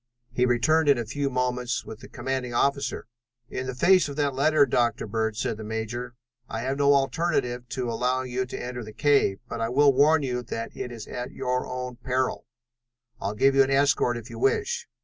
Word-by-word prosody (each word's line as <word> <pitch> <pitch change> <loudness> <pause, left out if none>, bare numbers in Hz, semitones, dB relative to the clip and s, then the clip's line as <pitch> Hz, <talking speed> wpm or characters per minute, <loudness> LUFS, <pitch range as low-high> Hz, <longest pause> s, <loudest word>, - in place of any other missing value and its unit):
He 125 0 +2
returned 145 +6 +3
in 140 - +5
a 120 - -2
few 140 +5 -2
moments 125 -1 -1
with 110 - -9
the - - -11
commanding 130 -2 -3
officer. 140 +2 0 0.4
"In 130 - -4
the 130 - -4
face 185 +4 +4
of 140 - -6
that 145 -2 0
letter, 145 +2 +4
Dr. 120 -3 +1
Bird," 110 0 -2
said 110 - -2
the 110 - -7
major, 110 +3 -4 0.3
"I 110 - -3
have 135 +3 -2
no 140 0 +5
alternative 135 -4 0
to 125 -2 -3
allowing 125 +2 -1
you 130 +1 -1
to - - -6
enter 125 -1 -5
the 110 0 -10
cave, 140 -9 +3
but 115 - -5
I 115 - 0
will 140 +3 +5
warn 145 +3 +4
you 125 -2 -2
that 115 -1 -6
it 125 - -5
is 115 -2 -8
at 125 0 -6
your 125 0 -2
own 125 -1 -5
peril. 130 +1 -2 0.7
I'll 100 +2 -3
give 135 +5 +4
you 135 - +5
an 135 - +3
escort, 135 -3 +2
if 115 -1 -8
you - - -9
wish." 460 +3 0
125 Hz, 205 wpm, -26 LUFS, 120-140 Hz, 0.7 s, in